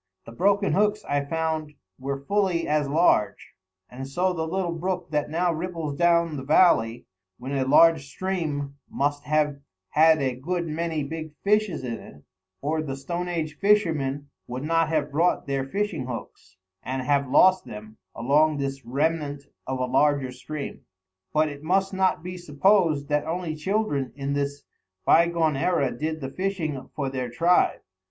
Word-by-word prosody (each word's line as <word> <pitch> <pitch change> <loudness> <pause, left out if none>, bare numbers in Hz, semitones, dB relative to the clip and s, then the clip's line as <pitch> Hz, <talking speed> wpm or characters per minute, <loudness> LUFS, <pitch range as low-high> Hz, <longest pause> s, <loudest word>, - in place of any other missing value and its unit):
The - - -10
broken 200 - +2
hooks 210 +1 +1
I 145 0 0
found 160 0 -2 0.3
were 135 +1 -4
fully 190 -4 +1
as 150 -2 +1
large; 140 - +2 0.3
and 130 +2 -8
so 180 +7 0
the 160 -2 -2
little 180 +1 -1
brook 180 0 -3
that 150 -1 0
now 170 +2 +1
ripples 165 -3 -4
down 170 -1 +2
the 135 - -5
valley, 135 -7 +3 0.3
when 130 +2 -7
a 135 -1 +1
large 155 0 +5
stream, 145 -5 -3
must 145 +1 -1
have 150 -1 +1 0.3
had 160 0 +5
a 130 -2 0
good 170 +7 -2
many 160 -1 -2
big 155 +1 -6
fishes 210 -7 +1
in 115 -3 -4
it, 75 0 -14 0.4
or 155 +2 0
the 135 -4 -4
stone 170 +6 -4
age 160 -3 -3
fishermen 155 -9 +1 0.2
would 125 +2 -5
not 165 +1 +2
have 150 -2 0
brought 165 +5 +1
their 135 -1 -1
fishing 170 - -2
hooks, 105 -5 -8 0.2
and 130 0 -3
have 140 0 +1
lost 185 +7 +5
them, 110 +1 -10 0.2
along 150 +5 +3
this 135 -1 -3
remnant 145 +2 -1 0.2
of 130 0 -2
a 130 - 0
larger 135 0 +2
stream. 140 +3 -7 0.5
But 155 0 +3
it 145 -1 -7
must 190 +4 +1
not 190 -3 +1
be 180 0 -6
supposed 165 -2 +2
that 150 0 0
only 165 -1 -3
children 155 - -1
in 140 0 -3
this 140 0 -2 0.4
by 170 +1 +6
gone 165 -3 +1
era 140 -2 +1
did 155 +1 -3
the 135 0 -5
fishing 170 -8 -3
for 140 -3 -2
their 130 -2 -3
tribe. 170 +8 +2
155 Hz, 165 wpm, -25 LUFS, 140-170 Hz, 0.5 s, by